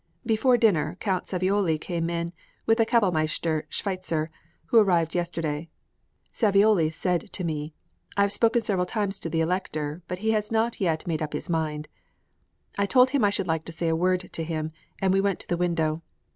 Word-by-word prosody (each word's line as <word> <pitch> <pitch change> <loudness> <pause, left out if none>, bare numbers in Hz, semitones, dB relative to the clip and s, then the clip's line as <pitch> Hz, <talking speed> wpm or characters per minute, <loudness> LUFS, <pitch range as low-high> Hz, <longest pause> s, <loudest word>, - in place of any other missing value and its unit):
Before 240 +3 +3
dinner, 175 -8 +2
Count 190 -4 -1
Savioli 185 -3 +1
came 170 0 -2
in 170 0 -3 0.3
with 225 +1 +3
the 225 - +4
kapellmeister 160 -7 +1
Schweitzer, 185 -5 -2 0.3
who 230 - +5
arrived 175 -6 +3
yesterday. 165 -3 -2 0.6
Savioli 200 -6 +4
said 175 +1 -2
co 185 - -3
me, 155 -2 -3 0.4
"I - - +4
have 200 - +1
spoken 230 +3 +3
several 190 -4 0
times 200 -2 -2
to 165 - -5
the 165 0 0
Elector, 160 -2 -2
but 180 - -4
he 220 +4 0
has 210 -1 0
not 225 0 0
yet 165 -4 0
made 160 -3 -2
up 150 -1 -3
his 150 +4 -4
mind." 155 -2 -1 0.9
I 200 - +2
told 255 +3 +5
him 275 -4 +2
I 205 - +5
should 200 -1 -1
like 160 -2 -1
to - - -7
say 165 0 -2
a 160 - +2
word 180 +2 +2
to 165 - -1
him, 160 -1 -3 0.3
and 190 -1 +2
we 195 - +3
went 200 -1 0
to - - -5
the 175 - 0
window. 165 -2 0
180 Hz, 190 wpm, -26 LUFS, 160-200 Hz, 0.9 s, who